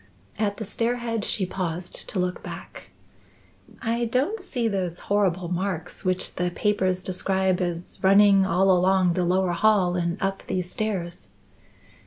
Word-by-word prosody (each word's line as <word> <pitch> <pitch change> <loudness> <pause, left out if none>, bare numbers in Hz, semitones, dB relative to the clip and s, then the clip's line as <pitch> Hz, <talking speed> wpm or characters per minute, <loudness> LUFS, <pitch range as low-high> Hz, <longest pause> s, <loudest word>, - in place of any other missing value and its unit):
At 205 -2 0
the 220 - -5
stair 230 +4 0
head 230 -3 -3
she 195 - -1
paused 180 -1 -4
to - - -4
look 180 0 -1
back. - - -9 0.9
"I 235 +1 0
don't 270 - 0
see 250 -11 -2
those 185 -5 -2
horrible 185 -3 +1
marks 180 -1 -3
which 185 0 -1
the 180 0 +1
papers 185 -1 0
describe 190 0 0
as 175 -1 -4
running 195 0 +6
all 190 +1 +3
along 185 0 +3
the 180 +1 0
lower 185 +1 +2
hall 180 -1 +3
and 170 +1 -1
up 195 -1 -1
these 180 -1 -2
stairs." 175 - -3
190 Hz, 150 wpm, -25 LUFS, 180-210 Hz, 0.9 s, running